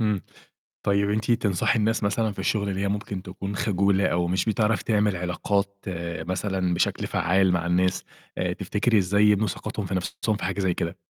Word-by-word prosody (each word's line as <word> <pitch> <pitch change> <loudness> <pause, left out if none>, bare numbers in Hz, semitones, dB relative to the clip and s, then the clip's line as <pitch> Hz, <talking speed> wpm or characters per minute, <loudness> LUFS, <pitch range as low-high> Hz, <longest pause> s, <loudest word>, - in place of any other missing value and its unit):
إمم، 105 -4 +1 0.6
طيب 100 0 +2
أنتِ 110 +2 -1
تنصحي 105 +1 +1
الناس 110 +1 +1
مثلًا 105 +1 +1
في - - -16
الشُغل 100 -2 0
اللي 95 -1 -2
هي 100 - 0
ممكن 100 -2 -3
تكون 95 +2 -6
خجولة، 100 -1 +2
أو 85 0 +1
مش 90 +1 0
بتعرف 110 0 +1
تعمل 105 -3 +1
علاقات 100 +3 -2 0.4
مثلًا 90 +1 -1
بشكل 85 - 0
فعّال 95 +2 +2
مع 85 -1 0
الناس، 90 +1 +1 0.3
آآ، - - 0
تفتكري 110 +2 +1
إزاي 100 +2 +3
يبنوا 105 0 +4
ثقتهم 95 +2 -4
في 95 - -3
نَفْسهم 100 +3 -1
في - - -5
حاجة 95 +2 -2
زي 95 -2 +1
كده؟ 85 +1 -3
100 Hz, 185 wpm, -25 LUFS, 90-105 Hz, 0.6 s, يبنوا